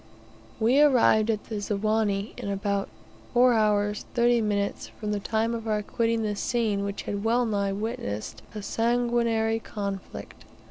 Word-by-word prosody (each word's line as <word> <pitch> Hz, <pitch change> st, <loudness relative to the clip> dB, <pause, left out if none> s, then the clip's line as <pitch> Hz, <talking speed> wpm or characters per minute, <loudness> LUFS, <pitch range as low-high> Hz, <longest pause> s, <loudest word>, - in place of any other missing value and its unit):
We 245 Hz, +6 st, +4 dB
arrived 240 Hz, -6 st, +5 dB
at 215 Hz, -2 st, 0 dB
the 215 Hz, -2 st, -5 dB
Ziwani, 210 Hz, 0 st, 0 dB
in 235 Hz, -5 st, -5 dB
about 200 Hz, 0 st, -1 dB, 0.5 s
4 250 Hz, 0 st, +6 dB, 0.4 s
h. 210 Hz, -, -6 dB
30 240 Hz, 0 st, +4 dB
m. 205 Hz, -2 st, 0 dB, 0.3 s
from 210 Hz, -1 st, -3 dB
the 205 Hz, -, 0 dB
time 225 Hz, +3 st, 0 dB
of 230 Hz, -1 st, -5 dB
our 210 Hz, -1 st, 0 dB
quitting 230 Hz, +1 st, 0 dB
the 210 Hz, -1 st, -1 dB
scene 215 Hz, -3 st, 0 dB
which 200 Hz, 0 st, -4 dB
had 200 Hz, 0 st, -4 dB
well 240 Hz, +2 st, +2 dB
nigh 200 Hz, -3 st, 0 dB
witnessed 195 Hz, -, -4 dB
a 210 Hz, -, -5 dB
sanguinary 230 Hz, -1 st, +1 dB
conflict. 200 Hz, -3 st, -6 dB
220 Hz, 150 wpm, -26 LUFS, 200-230 Hz, 0.5 s, 4